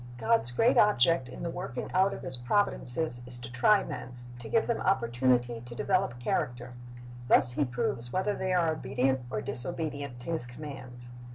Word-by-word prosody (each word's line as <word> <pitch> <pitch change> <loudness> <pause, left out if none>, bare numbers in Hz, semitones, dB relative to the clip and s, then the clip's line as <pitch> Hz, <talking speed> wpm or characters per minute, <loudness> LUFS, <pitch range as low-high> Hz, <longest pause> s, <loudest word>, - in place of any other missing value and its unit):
"* - - -14
God's 115 0 +3
great 225 - +3
object 165 -7 +3
in 125 - -8
the 170 - -2
working 175 -9 -5
out 190 +2 +4
of - - -7
His 130 - -2
providences 125 -1 0
is 125 0 -7
to 120 0 -9
try 195 - +4
men, 125 0 -7 0.2
to 120 - -8
give 225 - +2
them 235 - -1
opportunity 120 -6 +1
to 120 -1 -10
develop 185 -6 0
character. 120 0 -2 0.5
Thus 125 - +5
He 145 +3 0
proves 120 -1 -3
whether 190 +3 0
they 190 -1 -2
are 175 -3 +3
obedient 130 -3 0
or 105 -2 -3
disobedient 145 -2 -5
to 170 - -5
His 160 -7 -2
commands. 125 -2 -9
125 Hz, 180 wpm, -29 LUFS, 120-170 Hz, 0.5 s, Thus